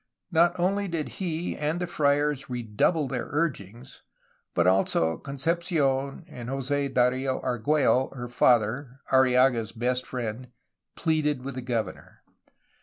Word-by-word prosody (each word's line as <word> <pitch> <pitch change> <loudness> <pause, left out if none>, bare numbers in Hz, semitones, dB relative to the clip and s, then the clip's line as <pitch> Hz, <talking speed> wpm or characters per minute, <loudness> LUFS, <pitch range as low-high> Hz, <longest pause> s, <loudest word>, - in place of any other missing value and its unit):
Not 175 +2 +3
only 195 +3 +1
did 165 -4 -3
he 175 -2 -3
and 150 +3 -1
the 180 - -1
friars 145 -4 +1
redouble 125 +6 0
their 125 -2 -3
urgings, 130 - -3 0.5
but - - +3
also 90 -3 +2
Concepci6n 140 -2 -1
and 120 -1 -8
Jos^ 135 +1 -1
Dario 130 +1 +1
Argiiello 130 +1 +1
(her 125 -1 -5
father), 125 +2 +2
Arrillaga's 125 -3 +4
best 125 +2 -1
friend, 125 0 -4 0.5
pleaded 150 -5 0
with 135 +1 -5
the 130 - -5
governor. 115 -6 -4
135 Hz, 120 wpm, -27 LUFS, 125-150 Hz, 0.5 s, Arrillaga's